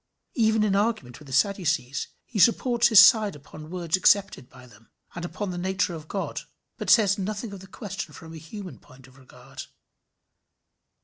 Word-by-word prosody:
Even 220 -2 +2
in 200 -2 +1
argument 200 - -1
with 150 - -15
the - - -11
Sadducees 160 -5 0 0.2
he 220 - -5
supports 240 +2 +3
his 220 -4 +7
side 210 -1 +6
upon 155 +2 -12
words 170 -2 -1
accepted 195 -7 +2
by 130 -1 -16
them, 115 -2 -20 0.2
and 175 - -7
upon 190 +2 -5
the 175 - -5
nature 185 0 -1
of 155 -1 -9
God, 195 +2 -4 0.4
but - - -4
says 205 -3 +4
nothing 205 +2 -4
of 195 - -8
the 190 - -13
question 195 -5 -7
from 160 +2 -12
a - - -9
human 185 +4 -10
point 130 0 -18
of 130 -1 -20
regard. 130 - -12
190 Hz, 180 wpm, -25 LUFS, 155-205 Hz, 0.4 s, his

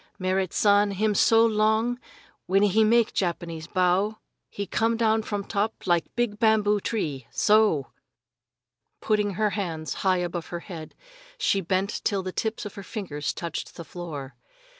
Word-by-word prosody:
Merrit 185 -1 0
San 205 0 +4
him 210 +2 0
so 225 +3 +5
long 220 +2 +2 0.5
when 195 +2 +3
he 205 +2 +4
make 230 +1 +3
Japanese 170 -3 -2
bow 185 +4 +1 0.3
he 200 - -4
come 225 +4 0
down 220 -1 +2
from 205 -2 -3
top 210 +2 -2
like 175 -2 +2
big 235 -3 -1
bamboo 215 -2 +3
tree 150 - -3
so!" 210 - +3 1.1
Putting 210 -2 0
her 210 +1 +1
hands 165 -7 -3
high 190 -1 +3
above 175 -1 -3
her 175 -1 -5
head, 165 -5 -9 0.4
she 200 - +1
bent 190 +3 -1
till 200 -3 0
the 185 - -4
tips 220 +3 -3
of 205 - -6
her 200 - -8
fingers 180 -8 -4
touched 170 -2 -6
the 170 - -8
floor. 150 -7 -7
200 Hz, 155 wpm, -26 LUFS, 175-215 Hz, 1.1 s, so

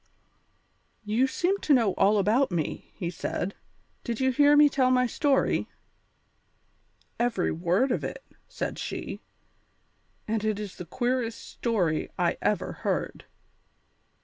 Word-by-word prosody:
"You 225 +5 +2
seem 370 +8 0
to 295 - +4
know 225 -6 +2
all 205 +2 +3
about 220 +7 +3
me," 165 -4 -3
he 175 -2 -3
said; 180 +2 -3 0.5
"did 235 -3 -3
you 260 0 +2
hear 290 +3 +5
me 295 0 +8
tell 265 -3 +2
my 250 0 +3
story?" 270 +3 +1 1.5
"Every 235 -6 +1
word 180 - +1
of - - -1
it," - - -5 0.2
said - - -4
she, - - -5 1.1
"and 220 -1 -1
it 215 -1 0
is 205 -3 -7
the 180 - -7
queerest 245 +1 -1
story 185 -10 -1
I - - 0
ever - - 0
heard. - - -2
235 Hz, 130 wpm, -27 LUFS, 200-260 Hz, 1.5 s, me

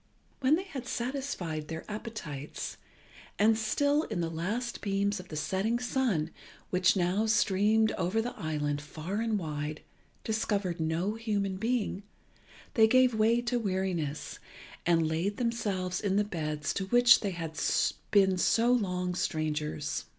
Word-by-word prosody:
When 275 +3 +4
they 365 - -2
had 275 -10 -7
satisfied 235 - -3
their 160 +1 -6
appetites, 210 - -6 0.6
and 220 +2 +5
still 285 +7 +2
in 215 -5 -3
the 165 -1 -1
last 210 +9 -3
beams 200 0 0
of 180 - -10
the 155 - -7
setting 195 +9 0
sun, 240 - 0 0.4
which 185 +2 +4
now 190 +4 +1
streamed 215 +1 +3
over 185 +5 +1
the 240 +2 -2
island 150 -2 -2
far 160 +7 -4
and 225 -2 +1
wide, 150 -3 -4 0.4
discovered 205 -5 -1
no 165 +6 0
human 205 -4 -1
being, 225 -2 -1 0.7
they 220 -1 +6
gave 255 +1 +5
way 225 +2 +3
to 240 0 0
weariness, 185 -8 -2 0.5
and 165 -2 +4
laid 170 +6 -1
themselves 205 -7 -1
in 195 -2 0
the 205 - +4
beds 155 -7 -3
to 190 -1 -3
which 245 +3 +7
they 205 - -2
had 165 -3 -5 0.5
been 190 -2 +4
so 230 +6 +3
long 180 -6 0
strangers. 155 -3 -2
195 Hz, 145 wpm, -30 LUFS, 165-225 Hz, 0.7 s, which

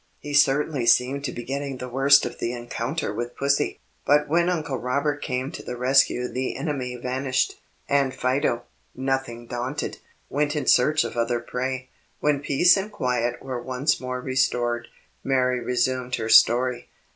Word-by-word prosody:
He 145 - -7
certainly 140 -2 +2
seemed 130 +4 +3
to 125 - -2
be 120 - -7
getting 140 +1 -4
the 125 - -6
worse 135 +3 +5
of - - -6
the 120 - -2
encounter 120 +2 -3
with 120 +3 -5
Pussy; 140 +1 0 0.2
but 150 +1 +3
when 170 +3 +2
Uncle 155 -7 -2
Robert 140 +3 -1
came 130 +2 -3
to - - -7
the 125 - -6
rescue 125 -1 +3
the 130 +1 -3
enemy 130 -6 -3
vanished, 130 +1 -1 0.3
and 140 -2 +2
Fido, 125 -2 0 0.3
nothing 130 -3 -2
daunted, 125 +5 -4 0.3
went 145 +1 -1
in 145 -3 -2
search 150 +6 +4
of - - -5
other 120 0 0
prey. 130 +2 -4 0.3
When 150 -1 +1
peace 145 +7 +4
and 200 +2 -3
quiet 125 - -1
were 130 -2 -4
once 130 +4 0
more 125 0 -4
restored, 120 -2 0 0.4
Mary 125 -2 +1
resumed 125 +1 -1
her 110 -1 -4
story. 125 +2 +4
130 Hz, 160 wpm, -24 LUFS, 125-140 Hz, 0.4 s, worse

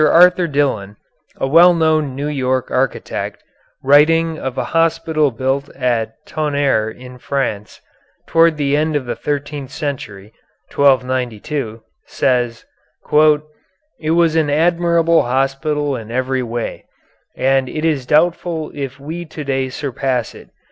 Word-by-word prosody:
Arthur 180 +3 +5
Dillon, 135 -9 -1 0.4
a - - -1
well 170 +5 +6
known 155 -4 +1
New 140 +2 -3
York 130 -3 -1
architect, 130 +1 -2 0.4
writing 160 +4 +4
of 130 -1 -5
a - - 0
hospital 165 -2 +2
built 135 +3 -2
at 120 -4 -1
Tonnerre 140 -7 0
in 125 +2 -12
France, 120 -7 -3 0.5
toward 165 -1 +3
the 145 -1 +1
end 155 +1 0
of 140 -3 -1
the 120 - -3
thirteenth 145 -1 -4
century 120 - -6 0.4
(1292), 130 -2 0 0.3
says: 120 -3 0 1.3
"It 155 0 -2
was 165 -2 +3
an 160 -2 +2
admirable 170 +1 +3
hospital 135 +3 -1
in 115 -3 -8
every 130 +2 -1
way, 120 -1 -5 0.5
and 135 0 +1
it 155 +1 -3
is 145 -6 0
doubtful 165 0 +1
if 135 -1 -6
we 160 +5 -6
to 155 -1 -8
day 135 -1 -1
surpass 130 -3 -2
it. - - -14
140 Hz, 125 wpm, -18 LUFS, 130-155 Hz, 1.3 s, well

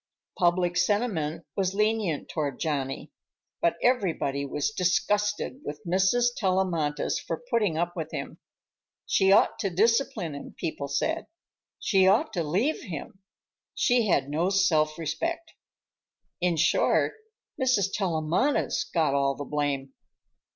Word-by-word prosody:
Public 175 0 +2
sentiment 175 -5 0
was 195 -1 0
lenient 210 -6 0
toward 145 -5 -3
Johnny, 140 -4 -3 0.5
but 170 - +2
everybody 165 - +1
was 145 +7 -1
disgusted 210 +6 0
with 145 0 -6
Mrs. 190 +7 +3
Tellamantez 180 -7 0
for 165 - -5
putting 210 -9 +1
up 175 +1 -1
with - - -4
him. - - -6 0.7
She 190 0 +3
ought 200 - +4
to 195 - 0
discipline 220 - +1
him, 140 - -9
people 155 -4 -4
said; 320 - -1 0.5
she 190 -2 +3
ought 195 +3 +3
to 175 - 0
leave 200 - 0
him; 185 - -7 0.6
she 245 -3 +2
had 140 -7 +2
no 160 +6 0
self 160 -6 +2
respect. 170 - -3 0.9
In 175 -2 +1
short, 160 - +2 0.5
Mrs. 250 -7 +2
Tellamantez 175 - 0
got 160 -5 +2
all 140 -1 +1
the 145 - -6
blame. 140 -2 -2
180 Hz, 125 wpm, -27 LUFS, 155-210 Hz, 0.9 s, ought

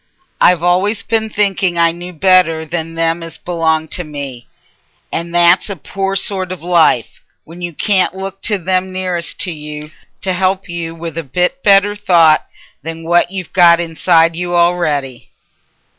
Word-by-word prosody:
I've 175 -2 +4
always 195 +4 +1
been 220 0 -1
thinking 195 -4 0
I 170 0 +4
knew 175 +2 -8
better 175 -2 +2
than 165 0 -5
them 165 +1 0
as 165 -1 -8
belonged 160 -2 -1
to 180 - -2
me, 140 -6 -7 0.6
and 170 +1 -4
that's 175 +4 +4
a 200 - -4
poor 195 +4 -4
sort 190 -1 -1
o' - - -3
life, 170 -8 +1 0.2
when 170 +3 -13
you 175 0 -4
can't 190 +3 0
look 195 0 -7
to 210 - +1
them 185 +1 -1
nearest 185 -2 -3
to 180 - -1
you 150 -1 -8 0.3
t' 190 - -2
help 185 +1 -1
you 170 -1 -5
with 165 -1 -6
a - - -4
bit 180 - -1
better 200 0 +4
thought 170 -6 +3 0.3
than 165 +2 -7
what 175 +1 +2
you've 185 -2 -7
got 170 -2 +6
inside 165 0 +2
you 175 0 -3
a'ready." 155 -7 0
175 Hz, 165 wpm, -15 LUFS, 165-185 Hz, 0.6 s, got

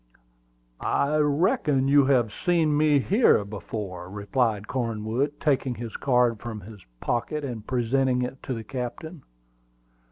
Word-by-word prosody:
"I 150 +2 +1
reckon 150 - +2
you 140 0 +5
have 120 -6 +3
seen 165 -4 +1
me 150 -1 +4
here 185 - +3
before," 100 -3 -6
replied 105 +1 -1
Cornwood, 120 +4 -2
taking 135 -4 +1
his 115 -2 -7
card 125 -4 +2
from 115 -1 -6
his 105 0 -12 0.2
pocket 145 +5 -2
and 115 -5 -6
presenting 125 +1 +1
it 125 +2 -5
to 130 - -4
the 115 - -6
captain. 135 +7 -6
125 Hz, 130 wpm, -26 LUFS, 110-145 Hz, 0.2 s, you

